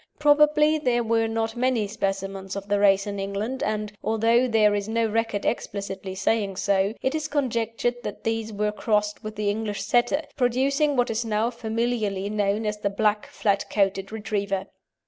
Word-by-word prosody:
Probably 300 +1 +4
there 245 -4 +1
were 225 0 +1
not 225 0 -2
many 245 -3 +1
specimens 195 -1 -3
of 200 0 -6
the 205 0 +1
race 195 -1 +4
in 200 -1 -4
England, 200 +7 -3
and, 210 0 -2
although 230 +3 +3
there 215 -3 +4
is 205 +1 -2
no 230 0 +1
record 225 -2 -1
explicitly 195 -4 -3
saying 195 0 0
so, 200 +1 +1
it 265 - +1
is 310 -1 -2
conjectured 240 -4 -1
that - - -6
these 225 -1 -1
were 210 0 -1
crossed 210 0 -1
with 215 0 -6
the 210 -1 0
English 210 -1 -3
Setter, 245 +5 +2
producing 275 +4 +2
what 245 -2 +2
is 225 +1 -1
now 225 +1 0
familiarly 220 -4 -2
known 210 +1 0
as 210 0 -2
the 205 - 0
black, 210 +1 0
flat 200 -2 0
coated 195 -1 0
Retriever. 200 -3 -2
215 Hz, 170 wpm, -25 LUFS, 200-240 Hz, -, Probably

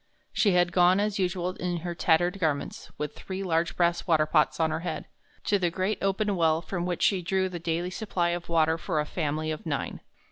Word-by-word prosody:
She 200 -4 +3
had 175 0 +3
gone, 180 +1 +4
as 205 0 0
usual, 180 -1 0
in 175 -1 -2
her 175 - -2
tattered 175 +3 +2
garments, 155 -5 -2
with 150 -1 -3
three 190 0 -5
large 165 -2 0
brass 170 0 +1
water 155 -3 +4
pots 155 +1 +2
on 160 -1 +2
her 155 - -1
head, 175 - -4 0.4
to 205 - +2
the 175 -2 +1
great 190 +5 -1
open 195 +1 0
well 160 -2 +3
from 175 0 -4
which 175 -2 -2
she 195 -3 +3
drew 190 +2 0
the 175 -1 -6
daily 170 +2 -2
supply 180 -3 -1
of 175 0 -4
water 160 0 +2
for 165 -2 -1
a 150 - 0
family 155 -1 -2
of 155 - -5
nine. 150 -4 -3
175 Hz, 215 wpm, -27 LUFS, 160-185 Hz, 0.4 s, gone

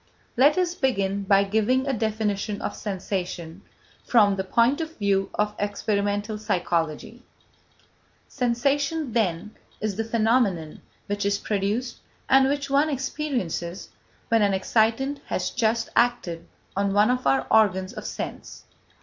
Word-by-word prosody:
Let 285 +6 +5
us 360 -1 +1
begin 200 - 0
by 195 0 +5
giving 220 +6 +1
a 275 - 0
definition 215 -2 -1
of - - -4
sensation 185 -3 -4 0.4
from 205 -4 +4
the 190 - -2
point 235 - +2
of 320 0 -6
view 195 -2 +1
of 210 0 0
experimental 205 +1 -1
psychology. 175 +2 -2 1.1
Sensation, 275 +3 0
then, 210 -3 -1 0.2
is 210 -2 -3
the 225 - 0
phenomenon 220 -8 +1 0.2
which 205 +1 -2
is 200 0 +1
produced 210 +5 -2 0.3
and 270 0 +5
which 280 0 -1
one 280 +3 +2
experiences 255 - -3 0.4
when 230 -1 +4
an 200 -1 +3
excitant 230 +8 +1
has - - -2
just 230 -1 0
acted 175 -8 +1 0.3
on 200 0 0
one 210 +4 +4
of 250 - -1
our 135 0 +2
organs 195 -2 +3
of 215 -3 -7
sense. - - -7
215 Hz, 130 wpm, -25 LUFS, 195-250 Hz, 1.1 s, Let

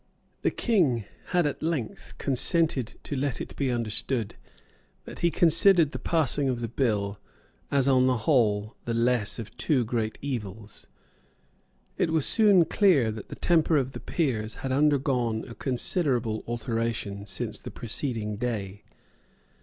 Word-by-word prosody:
The - - +2
King 150 - +1 0.2
had 175 -2 +1
at 145 - -2
length 155 -8 -4
consented 135 - +1
to 145 - -4
let 135 -2 -2
it - - -7
be 140 -2 -1
understood 115 -1 -1 0.7
that - - -9
he 170 - +2
considered 165 -1 +5
the - - -5
passing 145 -4 +1
of 125 -2 -1
the 120 - -3
bill 105 -5 -1 0.5
as 140 -1 +2
on 130 -1 +4
the 130 -1 +2
whole 110 -7 +2
the 115 - -2
less 115 -2 +1
of 110 -2 -8
two 130 -6 +1
great 110 -1 -2
evils. 110 -6 -6 1.1
It - - +2
was 160 -3 +1
soon 205 -6 +5
clear 160 - +3
that 110 -1 -9
the - - -7
temper 165 -2 +2
of 130 -2 -1
the - - -8
Peers 115 -10 -2
had 135 - -2
undergone 130 -5 +1
a 115 - -9
considerable 125 - 0
alteration 115 -3 -3
since 95 -2 -3
the - - -8
preceding 110 -3 -3
day. 105 -4 -4
125 Hz, 145 wpm, -27 LUFS, 110-150 Hz, 1.1 s, considered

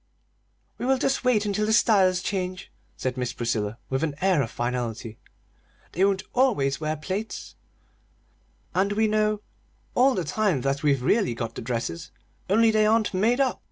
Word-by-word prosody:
"We 245 - -2
will 265 0 +3
just 270 +1 0
wait 235 -5 +2
until 210 +1 0
the 220 - +2
styles 190 -5 +4
change," 185 -2 -3 0.3
said 130 0 -3
Miss 125 -1 -2
Priscilla, 110 -2 -2
with 130 +1 0
an 150 -3 -1
air 185 -5 +3
of 115 - -2
finality. 120 -2 -4 0.7
"They 185 - 0
won't 195 -1 +2
always 195 - +2
wear 155 0 -1
plaits!" 195 +8 -5 1.2
"And 200 +2 +1
we 220 +1 +2
know 215 -1 +1 0.5
all 260 +2 +4
the 185 - -1
time 185 -3 0
that 135 +2 -1
we've 140 -4 +2
really 195 - +2
got 115 -1 -4
the - - -7
dresses, 115 -8 -4 0.4
only 225 +3 +4
they 215 -1 +3
aren't 220 -1 +2
made 225 +7 +2
up!" 265 -2 +1
185 Hz, 165 wpm, -25 LUFS, 130-215 Hz, 1.2 s, styles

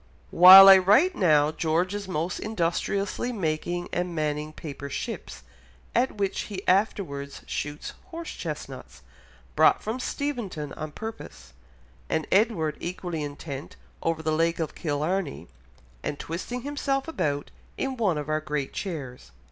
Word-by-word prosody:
"While 190 +3 +11
I 195 -1 +10
write 210 - +4
now 155 -5 +4
George 165 +4 0
is 205 -1 -5
most 175 0 -2
industriously 200 +3 -1
making 175 -3 -2
and 175 -1 -2
manning 150 0 -2
paper 140 -2 -8
ships, 65 - -6 0.5
at 250 +2 +2
which 200 -2 -1
he 195 -2 -7
afterwards 180 -8 0
shoots 150 0 -5
horse 335 0 -7
chestnuts, - - -7 0.5
brought - - +4
from 225 +4 -3
Steventon 230 - -4
on 155 0 -6
purpose; 220 - -9 0.6
and 160 -1 0
Edward 190 -8 +2
equally 175 -2 -4
intent 145 -1 -7 0.3
over 165 -1 -1
the 155 - 0
Lake 165 +2 +1
of 160 -2 -3
Killarney 155 +1 -2 0.5
and 145 - -4
twisting 210 +12 -5
himself 280 -1 -2
about 145 - -2 0.3
in 270 -1 -2
one 205 -10 +1
of 145 -1 -4
our 155 0 0
great 150 -3 -3
chairs." 145 -10 -6
170 Hz, 135 wpm, -26 LUFS, 150-205 Hz, 0.6 s, While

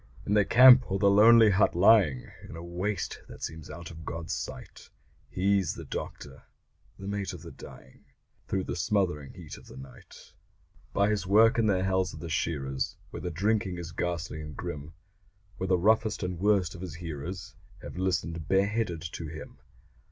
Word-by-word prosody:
In 105 - 0
the 105 -1 +4
camp 125 -1 +8
or 95 - +1
the 100 0 +4
lonely 110 +1 +7
hut 100 -2 +3
lying 90 - +4 0.2
In - - -8
a 85 - -8
waste 90 +1 -3
that - - -11
seems 80 -1 -6
out 85 -2 -8
of 80 -1 -11
God's 80 +1 -5
sight, - - -7 0.4
He's 95 -3 +1
the - - -8
doctor 70 -2 -7 0.6
the 95 - -9
mate 100 -1 -3
of - - -10
the - - -9
dying 65 - -14 0.4
Through 95 -1 -1
the - - -4
smothering 85 -6 -1
heat 80 -5 -10
of - - -16
the 65 - -12
night. 65 +1 -14 0.6
By 100 +1 +2
his 100 -4 -2
work 115 +5 +5
in 110 - +2
the 95 -3 +2
hells 95 -3 0
of - - -9
the 85 +1 -7
shearers, 70 -5 -2
Where - - -7
the 90 - -3
drinking 95 +1 0
is 85 -2 -7
ghastly 85 -2 -3
and 75 -2 -9
grim, 75 +2 -6 0.6
Where 95 - -3
the 90 -1 +3
roughest 110 +3 +2
and 90 -2 -3
worst 100 -3 +2
of 90 - -10
his 90 -5 -7
hearers 85 +1 -7 0.3
Have - - -8
listened 85 -4 -2
bareheaded 100 -3 0
to 85 -1 -6
him. 75 -1 -10
90 Hz, 180 wpm, -28 LUFS, 80-100 Hz, 0.6 s, camp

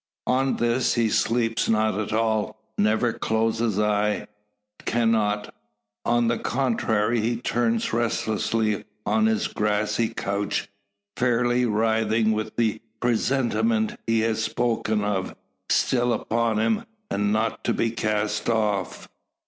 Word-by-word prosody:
On 130 +1 +1
this 120 +2 +1
he 115 -2 +2
sleeps 115 0 +1
not 110 -1 +2
at 110 - -3
all 110 -1 0 0.2
never 110 +3 +2
closes 110 -1 0
eye 105 0 +1 0.6
cannot. 110 -3 +1 0.5
On 120 0 +2
the 115 0 0
contrary, 115 -3 0
he 115 +2 0
turns 115 -2 0
restlessly 110 -2 0 0.2
on 220 0 +2
his 220 0 +1
grassy 105 +1 0
couch, 100 +1 -2 0.5
fairly 120 0 +2
writhing 110 0 +2
with 110 0 -3
the 110 -2 0 0.2
presentiment 135 - +1
he 115 -1 +2
has 110 0 0
spoken 110 -3 0
of, 100 -2 -2 0.3
still 120 -1 +2
upon 115 0 0
him, 110 0 +1 0.3
and 105 +1 +1
not 110 +1 -1
to - - +2
be 115 - 0
cast 105 -1 -1
off. 105 -4 -1
115 Hz, 120 wpm, -24 LUFS, 105-120 Hz, 0.6 s, he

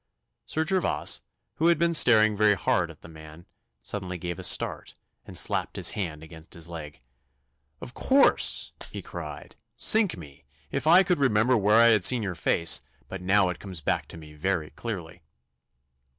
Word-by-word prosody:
Sir 160 0 -1
Gervas, 185 +2 +1 0.4
who 165 - +2
had 170 - +4
been 170 0 +1
staring 110 -8 +5
very 105 0 +3
hard 90 -2 0
at 80 - -15
the - - -11
man, 80 +1 -13 0.4
suddenly 90 +2 -4
gave 85 -1 -6
a - - -7
start, - - -1 0.3
and - - -3
slapped - - -1
his - - -3
hand 80 -7 -5
against 80 0 -11
his 85 -1 -8
leg. 80 -4 -9 0.8
'Of 125 - -9
course!' 275 +1 +2 0.2
he - - -8
cried. - - -9 0.2
'Sink 215 - +3
me, 70 -4 -13 0.3
if - - -3
I 175 +4 +7
could 180 -3 0
remember 125 -2 +2
where 105 -1 +2
I 115 0 +6
had 105 -5 +3
seen 120 +3 +4
your 95 -3 -3
face, 80 -5 +1 0.3
but 95 - -7
now 95 0 +2
it 90 - -5
comes 95 -4 -7
back - - -1
to - - -11
me 75 -2 -13
very 80 0 -2
clearly. 90 -7 -7
95 Hz, 175 wpm, -26 LUFS, 80-115 Hz, 0.8 s, I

